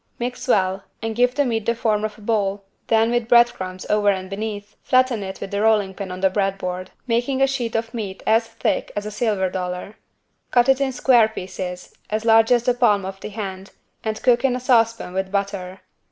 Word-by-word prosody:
Mix 245 +2 -4
well 190 -4 +2 0.2
and 225 -1 -2
give 250 +2 +2
the 285 0 +2
meat 225 -4 -2
the 235 - +2
form 215 -2 0
of 215 -1 -3
a - - -15
ball 205 -2 -1 0.2
then 225 +1 +3
with 240 -2 0
bread 240 0 +6
crumbs 185 0 -7
over 210 -1 +3
and 190 -1 -2
beneath 210 0 -5
flatten 255 -3 +2
it 190 -1 -6
with 195 - -6
the 200 0 -1
rolling 210 -3 +2
pin 190 -1 -6
on 180 0 -6
the 190 - +4
bread 195 0 0
board 185 -1 -4 0.2
making 245 +2 0
a 270 - +5
sheet 260 -4 -2
of 225 +1 -2
meat 205 -5 -5
as 225 +1 +3
thick 225 0 -2
as 205 0 -3
a 210 - -5
silver 210 -3 0
dollar. 180 +2 -5 0.5
Cut 245 0 +3
it 270 +1 +4
in 270 -1 +1
square 245 -3 +4
pieces, 185 -3 -7 0.2
as 215 +1 -2
large 225 +1 +5
as 240 -1 +4
the 250 - +2
palm 210 -6 +2
of 195 0 -6
the - - -7
hand 195 -2 -7 0.3
and 220 -1 -2
cook 245 -1 +4
in 260 -2 +2
a - - -2
saucepan 230 -6 +2
with 190 0 -2
butter. 195 -2 -3
215 Hz, 220 wpm, -22 LUFS, 195-235 Hz, 0.5 s, bread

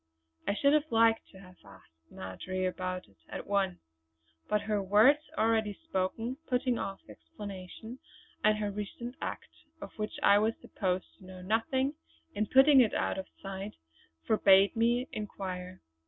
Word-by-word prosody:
I 200 - +1
should 280 +5 +3
have 305 +1 +2
liked 225 0 +4
to 190 - -15
have 185 -2 -15
asked 100 -4 -17 0.2
Marjory 185 - -4
about 185 0 -3
it - - -26
at - - -6
once; 195 -3 0 0.7
but 210 0 +2
her 210 -1 -1
words 215 +10 +5 0.2
already 220 -1 +2
spoken 225 +3 -2
putting 250 -1 +1
off 195 0 -4
explanation, 190 - -9 0.4
and 215 0 +4
her 210 -1 -2
recent 210 +4 -6
act, - - -4 0.3
of - - -8
which 215 0 -3
I 200 +1 +6
was 220 +2 +1
supposed 185 -2 -2
to 190 - -15
know 185 -1 -10
nothing, 260 - 0 0.4
in 210 +1 -1
putting 270 +2 +7
it 225 - +2
out - - 0
of 190 - -6 0.2
sight, 195 +1 -6 0.5
forbade 195 -2 +5
me 240 +2 +2
to - - -14
inquire. 185 -3 -6
205 Hz, 155 wpm, -31 LUFS, 185-230 Hz, 0.7 s, putting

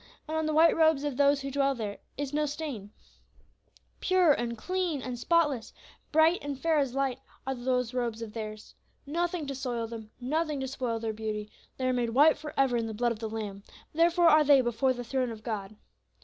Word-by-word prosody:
And 315 - -3
on 315 0 0
the 310 - 0
white 325 +2 +5
robes 315 -3 +4
of 290 -3 -2
those 280 +1 +3
who 275 0 -4
dwell 275 0 +1
there 210 -4 -5 0.2
is 285 0 -4
no 300 0 +1
stain; 280 -9 -5 1.1
pure 370 -4 +4
and 235 -2 -3
clean 360 +2 -1
and 250 -2 -5
spotless, 295 -5 +1 0.4
bright 320 +3 +4
and 285 -2 -4
fair 320 +1 +2
as 270 -3 -1
light, 270 -2 0 0.3
are 265 - -1
those 250 -1 -1
robes 235 -2 -2
of 215 -2 -8
theirs. 215 -1 -7 0.3
Nothing 340 +2 -1
to 275 - -4
soil 250 -3 -3
them, 225 -1 -8
nothing 300 +3 -1
to 265 - -3
spoil 250 -3 -2
their 225 -1 -3
beauty, 215 -1 -4 0.3
they 260 - -2
are 255 - +2
made 245 -2 0
white 290 +7 +5
for 300 0 -7
ever 270 -3 +3
in 230 -1 -1
the 220 - -5
blood 240 +2 +1
of 225 - -4
the 220 -1 -4
Lamb; 210 -3 -5 0.3
therefore 340 +2 +4
are 310 -1 +7
they 285 -2 +6
before 240 +2 +1
the 245 -1 -4
throne 255 +1 -1
of 220 -1 -8
God. 215 -2 -4
265 Hz, 210 wpm, -29 LUFS, 230-300 Hz, 1.1 s, are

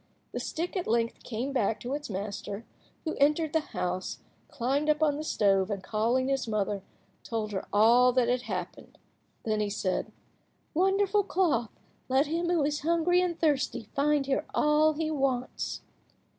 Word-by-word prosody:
The - - -3
stick 340 +4 -3
at 365 - -2
length 230 0 0
came 250 +4 -4
back 225 -4 +1
to 250 +3 -4
its 295 -2 -4
master, 200 +2 -5 0.4
who 315 - -1
entered 300 +2 +2
the 320 - +4
house, 185 - -3 0.3
climbed 275 +5 -1
up 305 +1 +3
on 295 -2 +3
the 300 - -4
stove, 195 -8 +2
and, 200 -2 -3
calling 230 +6 +1
his 270 -2 0
mother, 205 -2 -1 0.4
told 220 -2 -3
her 190 - -4
all 235 +4 +6
that 250 -1 +3
had 245 +1 +1
happened. 185 -7 -6 0.5
Then 215 -1 0
he 210 -1 0
said— 190 -2 -2 0.6
"Wonderful 390 +4 +3
cloth, 300 - +1 0.4
let 265 +3 +4
him 335 +3 -1
who 340 -4 +2
is 295 +1 0
hungry 340 +3 +2
and 350 -2 -1
thirsty 265 -7 0
find 290 0 +2
here 275 +2 -1
all 300 +1 +4
he 315 +1 -2
wants." 270 -4 -1
265 Hz, 165 wpm, -29 LUFS, 220-310 Hz, 0.6 s, all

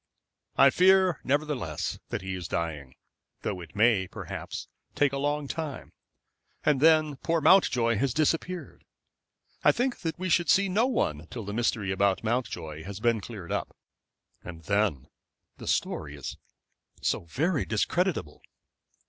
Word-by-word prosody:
"I 135 0 +7
fear, 185 0 +4
nevertheless, 135 - -1
that - - -3
he 95 0 -4
is 90 -3 -5
dying, 75 -7 -4 0.5
though 90 - -3
it 80 -3 -12
may, 105 -3 +3
perhaps, - - -6 0.3
take 145 -2 +2
a 140 - -1
long 145 0 -1
time. 155 -2 -5 0.7
And 145 -3 +3
then 155 -2 +4
poor 165 +5 0
Mountjoy 125 - +4
has 135 +4 +1
disappeared. 165 +5 -1 0.8
I - - +7
think 250 0 -1
that 165 -2 -3
we 185 +1 -3
should 175 0 +2
see 200 -1 +4
no 215 +7 +3
one 75 - -1
till 115 -4 -6
the 100 - -5
mystery 110 -3 0
about 95 +1 +1
Mountjoy 85 -10 -3
has 100 +2 -7
been 115 -1 +2
cleared 100 -5 -8
up. - - -3 0.7
And 85 -1 -9
then 100 -6 +1 0.5
the - - -9
story 75 -2 -1
is 70 - -6 0.7
so - - 0
very 145 - 0
discreditable." 125 - -1
120 Hz, 145 wpm, -28 LUFS, -, 0.8 s, I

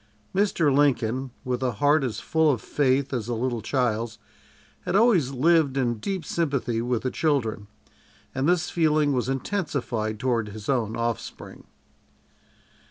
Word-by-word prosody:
Mr. 175 -8 +2
Lincoln, 130 -2 +1 0.2
with 125 -1 -2
a 125 -2 0
heart 145 +7 +3
as 125 -5 -2
full 160 -1 +2
of 130 -6 +1
faith 135 0 0
as 120 -4 -2
a 120 - -1
little 120 0 -2
child's, 115 -2 -1 0.6
had - - -3
always 200 - +4
lived 140 +1 +2
in 120 -4 0
deep 190 - -3
sympathy 135 -8 -1
with 120 -1 -1
the 130 - -1
children, 120 -9 0 0.7
and 135 +4 0
this 175 -1 +1
feeling 155 -3 +2
was 125 0 -1
intensified 135 - -2
toward 120 -4 0
his 105 0 -9
own 115 -5 0
offspring. 115 -1 -5
130 Hz, 145 wpm, -25 LUFS, 115-150 Hz, 0.7 s, always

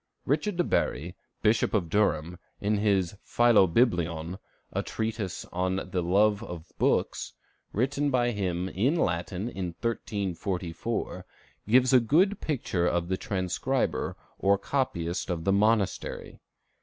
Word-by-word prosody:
Richard 155 +8 0
de 175 - +3
Bury, 85 - -1 0.3
Bishop 110 +1 +3
of 95 -5 +1
Durham, 85 -3 +1 0.2
in 105 +1 +1
his 100 -3 +1
"Philobiblion," 90 -6 +3 0.3
a - - 0
treatise 110 -4 -3
on 95 +1 -1
the 90 - 0
love 100 +4 +3
of 90 -7 -8
books, - - +1 0.4
written 140 +6 0
by 120 -2 +2
him 90 -4 -2
in 115 - +1
Latin 90 - -1
in 90 -7 -4
1344, 100 -3 -3 0.4
gives 130 +4 +5
a 130 - +8
good 180 - +2
picture 95 - 0
of 85 0 0
the 95 - 0
transcriber, 100 +8 -1 0.2
or 100 +1 +4
copyist 95 -12 -2
of 85 -2 -2
the 95 - +2
monastery. 105 0 0
100 Hz, 125 wpm, -28 LUFS, 90-120 Hz, 0.4 s, a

